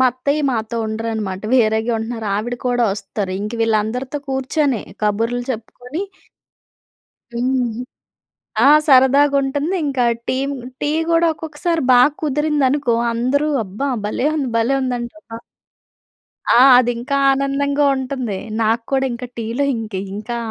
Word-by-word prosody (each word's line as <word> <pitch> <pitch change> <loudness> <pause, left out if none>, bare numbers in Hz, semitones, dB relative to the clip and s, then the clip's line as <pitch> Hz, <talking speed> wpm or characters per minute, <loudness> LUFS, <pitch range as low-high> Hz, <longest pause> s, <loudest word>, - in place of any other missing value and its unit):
మా 260 - +6
అత్తయ్య 280 +4 -1
మాతో 230 -1 -3
ఉండరనమాట. 220 -3 -3
వేరేగా 220 -1 +2
ఉంటనారు. 225 -1 -5
ఆవిడ 240 +4 -3
కోడా 245 -1 +2
వస్తరు. 195 -1 -4
ఇంక 210 +2 -4
వీళ్ళందరితో 225 +6 -1
కూర్చొని 265 -1 0 0.2
కబుర్లు 230 +4 0
చెప్పుకొని 250 - -6 1.3
హుహు. 245 -1 -1 0.8
ఆ! - - +6 0.2
సరదాగుంటంది. 280 +4 +3
ఇంకా 265 -3 0 0.3
టీమ్ 275 +2 -1 0.3
టీ 295 - +1 0.2
గూడొకొక్కసారి 330 0 0
బా 245 - +7 0.2
కుదిరిందనుకో! 290 -4 +1 0.2
అందరూ, 265 +6 0 0.2
అబ్బా 210 +10 -4 0.2
భలే 255 +7 -1
ఉంది 275 -5 -1
భలే 235 +4 +2
ఉందంటరా. 245 0 -5 1.1
ఆ! - - +5 0.2
అది 245 -1 +3
ఇంకా 280 +4 -2 0.2
ఆనందంగా 280 +1 0
ఉంటుంది. 255 -6 -3 0.3
నాకు 225 +2 +1
కూడా 265 0 +2
ఇంకా 245 +1 -6
టీలో 230 +5 -1
ఇంక, 220 -2 -6 0.2
ఇంకా 215 +3 -5
250 Hz, 115 wpm, -19 LUFS, 225-280 Hz, 1.3 s, బా